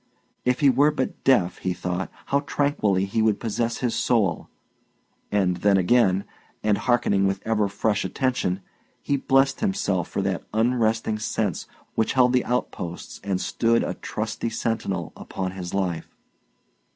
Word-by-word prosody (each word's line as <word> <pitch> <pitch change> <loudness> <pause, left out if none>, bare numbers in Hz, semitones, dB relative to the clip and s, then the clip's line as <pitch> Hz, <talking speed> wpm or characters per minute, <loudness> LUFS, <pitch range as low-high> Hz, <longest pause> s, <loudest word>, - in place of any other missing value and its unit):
If 125 +2 +1
he 140 - +6
were 145 +3 +4
but 145 -4 -3
deaf, 95 -10 +3
he 90 - -1
thought, 90 +1 -3 0.2
how 140 - +2
tranquilly 110 -11 +1
he 100 +3 0
would 110 -2 +2
possess 115 +1 -1
his 120 -3 0
soul! 110 -7 +1 0.8
And 95 -3 +2
then 100 +2 +3
again, 95 0 +3 0.4
and 105 -1 +2
hearkening 115 -6 +2
with 95 0 -1
ever 110 -2 +2
fresh 100 +1 0
attention, 125 -8 -1 0.4
he 140 - 0
blessed 135 0 +2
himself 190 - 0
for 100 - -2
that 95 -2 -1
unresting 110 -2 +1
sense 105 -4 -2 0.3
which 110 - +1
held 125 -1 +4
the 125 - +2
outposts 90 -8 -4
and 95 -2 -1
stood 115 +3 +1
a - - -2
trusty 115 - -4
sentinel 110 -7 -2
upon 95 -1 -4
his 90 -2 -6
life. 90 -4 -1
110 Hz, 150 wpm, -24 LUFS, 95-125 Hz, 0.8 s, he